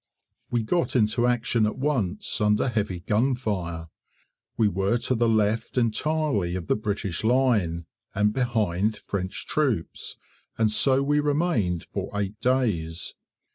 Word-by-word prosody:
We 120 -2 0
got 170 +8 0
into 120 +1 +3
action 120 -2 +2
at 105 - -4
once, 120 -11 -1
under 105 +4 +3
heavy 100 -6 -2
gunfire. 105 -7 -1 0.7
We 110 - +4
were 100 +4 +1
to 125 - -1
the 120 -1 +2
left 110 +2 +1
entirely 120 - +1
of 90 -2 -4
the - - +2
British 100 -4 -3
line, 110 -9 +2 0.3
and 105 +1 +2
behind 110 -5 0
French 95 -2 -4
troops, 130 - -1 0.4
and 110 -1 +2
so 135 +4 +3
we 145 +1 +2
remained 145 - +1
for - - -5
eight 100 +2 -4
days. 100 -11 0
110 Hz, 135 wpm, -25 LUFS, 95-125 Hz, 0.7 s, We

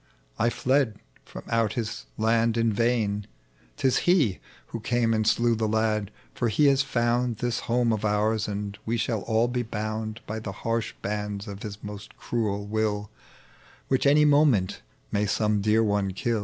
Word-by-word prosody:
I 120 - +3
fled 130 -3 +1 0.3
from - - -9
out 115 -2 +1
His 110 - -4
land 115 +1 +2
in 115 -1 +2
vain! 105 -3 0 0.3
— - - -33
'tis 130 - +2
He 145 - +3 0.3
"Who 115 - -5
eamc 115 +1 +1
and 110 -1 +1
slew 120 0 +3
tbe 110 -1 -1
lai^ 110 -2 +1 0.2
for 120 - 0
He 110 +8 +3
has 135 0 +3
found 120 -3 0
This 120 +1 -1
home 120 -1 +2
of 110 - -2
oiu's, 105 +1 +1
and 100 0 -4
we 115 +2 -1
shall 110 -1 -1
all 115 +2 +1
be 125 0 -1
bound 110 0 -4
By 110 +1 -4
tbe 100 -3 -6
harsh 115 -1 -2
bands 105 0 -3
of 100 0 -7
His 105 -1 -7
most 105 0 -9
cruel 105 -4 -2
will, 105 -1 -1 0.8
"Which 135 +1 +2
any 150 +2 +5
moment 145 -10 +3 0.3
may 105 +1 +1
some 105 0 +1
dear 110 +2 +3
one 100 -2 0
kill. 115 +3 -1
110 Hz, 175 wpm, -26 LUFS, 105-120 Hz, 0.8 s, any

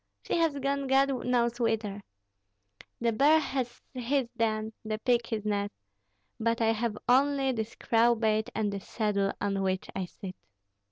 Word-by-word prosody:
She - - -1
has 325 -4 +2
gone 275 0 -1
God 270 -1 +2
knows 240 -1 +1
whither. 220 -3 0 1.0
The 235 0 +2
bear 285 +7 +5
has 260 -5 -3
his 255 +1 0
den, 220 -1 0
the 215 0 -2
pig 235 +1 +1
his 215 -2 -3
nest, 205 -1 -1 0.6
but 230 +1 +1
I 225 -1 +3
have 225 -1 -2
only 270 +1 +3
this 220 -2 -4
crowbait 225 -2 +2
and 210 -2 0
this 195 -1 -6
saddle 200 -3 0
on 200 -1 -1
which 190 -1 -1
I 190 - -1
sit." 185 +1 -9
230 Hz, 155 wpm, -29 LUFS, 215-260 Hz, 1.0 s, bear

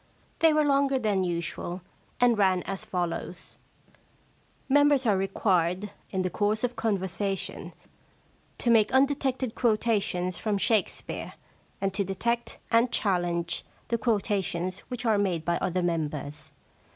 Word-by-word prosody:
They 325 -1 +6
were 305 0 +3
longer 275 -1 +3
than 210 -6 +1
usual, 175 +1 -3 0.4
and 245 -1 +5
ran 190 -3 +2
as 195 -1 -4
follows: 175 -2 -4 0.3
— - - -33
* - - -35 0.3
Members 285 -1 +4
are 210 -3 +4
required, 190 0 0 0.2
in 190 -1 -1
the 185 - -1
course 215 +2 0
of 245 0 -1
conversation, 195 -3 -2 0.9
to 240 - +1
make 220 -1 +4
undetected 265 -2 +1
quotations 210 -6 0
from 210 -2 0
Shakespeare, 210 0 -1 0.5
and 195 -1 -1
to 200 +1 +1
detect 235 +5 -2
and 235 +1 +4
chal 195 -4 +2
lenge 170 -1 -2 0.3
the 235 -1 0
quotations 195 -5 0
which 245 -1 -4
are 220 -3 +3
made 175 -5 0
by 170 0 +1
other 185 -1 -1
members. 150 -3 -3
200 Hz, 140 wpm, -27 LUFS, 180-235 Hz, 0.9 s, They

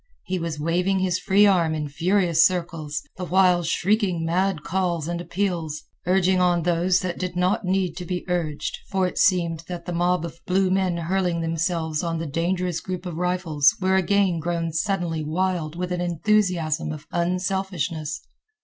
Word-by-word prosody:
He 185 0 -2
was 165 -3 -4
waving 180 +5 +1
his 185 -1 0
free 200 +3 +4
arm 170 -5 +3
in 150 -1 -3
furious 170 +2 +2
circles, 165 -5 -1
the 185 - -5
while 180 0 +4
shrieking 180 0 +1
mad 180 -1 0
calls 175 -4 -1
and 170 0 -3
appeals, 170 -5 -2 0.2
urging 185 0 +3
on 175 -2 +2
those 175 +2 +2
that 180 -2 -3
did 180 -1 -3
not 185 +3 +1
need 185 -2 0
to 180 - -5
be 180 +1 -4
urged, 165 -5 -2
for 190 -1 +1
it 180 - -3
seemed 170 -3 +2
that 175 -1 -6
the 175 - -4
mob 175 0 +1
of 165 0 -9
blue 185 0 +2
men 185 -2 +1
hurling 175 0 0
themselves 165 -1 -1
on 165 -1 -2
the 165 - -3
dangerous 175 +3 -1
group 185 0 -5
of 170 -3 -5
rifles 180 -5 +2
were 190 0 +2
again 190 -2 +2
grown 165 0 -2
suddenly 170 -3 -1
wild 165 0 -1
with 180 +1 -3
an 180 0 -1
enthusiasm 175 -3 +1
of 155 0 -8
unselfishness. 180 -3 -2
175 Hz, 170 wpm, -24 LUFS, 165-185 Hz, 0.2 s, free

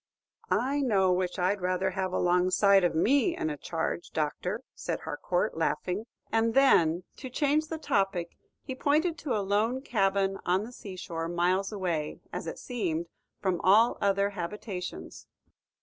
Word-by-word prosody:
"I 275 +3 +1
know 195 -8 +3
which 180 0 -1
I 180 +1 +2
'd 205 - -9
rather 185 +1 0
have 190 0 -2
alongside 185 +2 +4
of 175 - +1
me 280 - +3
in 155 - -1
a - - -3
charge, 165 +3 -3
Doctor," 180 - -2
said - - -4
Harcourt, - - -1
laughing; 195 +5 -1 0.2
and 225 0 +2
then, 175 -11 +4
to 260 - -7
change 295 +4 +1
the 320 - -4
topic, 195 - -1 0.3
he 265 - -5
pointed 305 +6 +1
to 270 -7 -1
a 200 - -2
lone 220 +6 +1
cabin 195 -4 +1
on 185 +3 +1
the 230 - -8
sea 195 -5 -9
shore, 165 -2 -4
miles 180 +3 +1
away, 175 -7 -2
as - - -4
it - - -5
seemed, 170 -9 -3 0.3
from 185 -3 0
all 215 +5 +5
other 200 0 +2
habitations. 185 0 -6
195 Hz, 160 wpm, -29 LUFS, 180-235 Hz, 0.3 s, all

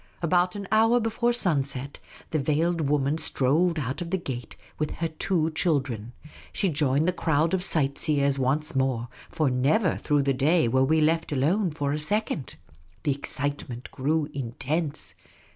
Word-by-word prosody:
About 180 +2 +2
an 200 -1 -5
hour 225 +3 +4
before 235 +1 0
sun 180 - +2
set 135 +1 -7 0.3
the 155 - +1
veiled 155 +2 0
woman 145 +1 +1
strolled 160 +7 +1
out 140 +3 -3
of 170 - -4
the 190 - 0
gate 130 -9 -6 0.2
with 150 -1 0
her 165 - -2
two 160 0 0
children. 135 - -1 0.4
She 195 - 0
joined 145 0 +1
the 180 - +2
crowd 160 0 +1
of 190 - +1
sight 140 -6 +1
seers 140 -3 +2
once 150 +4 0
more, 130 -3 0 0.2
for 150 -4 0
never 150 - +2
through 145 -1 +1
the 135 0 +2
day 145 +3 +3
were 130 +3 +3
we 155 +4 +3
left 160 +1 +1
alone 170 +9 +1
for 145 -2 -2
a 150 - -2
second. 185 - -2 0.5
The 150 - +1
excitement 140 -2 -4
grew 150 +3 0
intense. 140 +4 -1
150 Hz, 165 wpm, -26 LUFS, 135-170 Hz, 0.5 s, hour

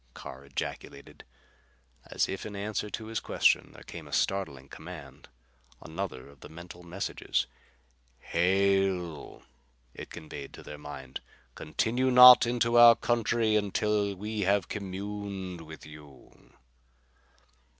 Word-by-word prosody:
Carr 65 +1 -9
ejaculated. 70 -1 -7 0.8
As - - 0
if 95 - -5
in 105 -1 -7
answer 105 +1 -3
to 110 +2 -6
his 110 0 -3
question - - +2
there - - -13
came - - -10
a - - -13
startling 70 -9 -1
command, - - -11 0.5
another 80 -6 -6
of 70 -1 -18
the - - -12
mental 85 +2 -11
messages. 90 +3 -2 0.9
"Halt!" 95 -2 +1 0.5
it - - -9
conveyed 75 -3 -9
to - - -11
their 75 - -9
mind. 70 -3 -8 0.3
"Continue 120 +11 -1
not 125 -1 +10
into 120 0 +2
our 120 -1 +10
country 115 -1 +1
until 105 0 0
we 105 +3 -5
have 100 -1 +2
communed 100 -2 -5
with 80 -1 -11
you." 75 -3 -16
95 Hz, 120 wpm, -29 LUFS, 80-105 Hz, 0.9 s, not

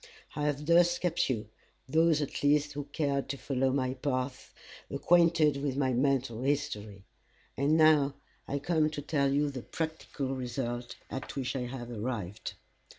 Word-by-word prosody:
I 150 - -1
have 145 0 -1
thus 175 +2 +5
kept 175 -5 0
you, 110 -5 -2 0.4
those 160 +1 +3
at 140 - -5
least 145 0 +3
who 145 0 -4
cared 140 -1 -1
to 140 - -2
follow 135 -1 0
my 130 -1 0
path, 130 -1 -3 0.4
acquainted 165 0 +4
with 140 -2 -1
my 130 -2 +2
mental 125 -2 +1
history. 110 -8 -2 0.5
And 145 +4 +3
now 150 -3 +5 0.3
I 140 - -1
come 155 +1 +1
to 150 -1 -5
tell 140 -2 +1
you 145 +1 +2
the 130 -2 -6
practical 160 -3 -4
result 120 -1 -4 0.2
at 135 - -5
which 135 -1 -2
I 125 -2 -2
have 120 -1 -6
arrived. 110 -3 -4
140 Hz, 155 wpm, -30 LUFS, 130-150 Hz, 0.5 s, thus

